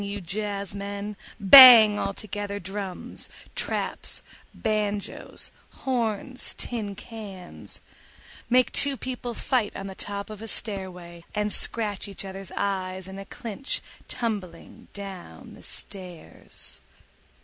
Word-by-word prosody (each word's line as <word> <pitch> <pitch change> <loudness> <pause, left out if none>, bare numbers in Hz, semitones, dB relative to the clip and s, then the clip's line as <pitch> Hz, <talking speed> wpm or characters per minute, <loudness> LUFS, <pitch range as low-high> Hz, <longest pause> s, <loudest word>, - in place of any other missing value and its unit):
you 200 0 -4
jazzmen, 200 +1 -4 0.2
bang 220 -1 +11
altogether 205 0 -4
drums, 195 0 -5 0.2
traps, - - -1 0.3
banjoes, 210 -2 -2 0.3
horns, 250 0 -2
tin 215 -5 -4
cans—make 220 +4 -4
two 280 -1 +3
people 245 -2 -5
fight 245 -6 0
on 195 - -5
the 195 - -6
top 200 +2 -5
of 215 -1 -9
a 225 - -6
stairway 180 -6 -2
and 210 0 +2
scratch 210 -3 +3
each 195 -1 -4
other's 195 0 -7
eyes 190 -2 -2
in 190 +1 -8
a 195 - -8
clinch 230 +6 -1 0.3
tumbling 200 -8 -5
down 190 - -9
the - - -14
stairs. 180 -4 -5
200 Hz, 105 wpm, -26 LUFS, 195-220 Hz, 0.3 s, bang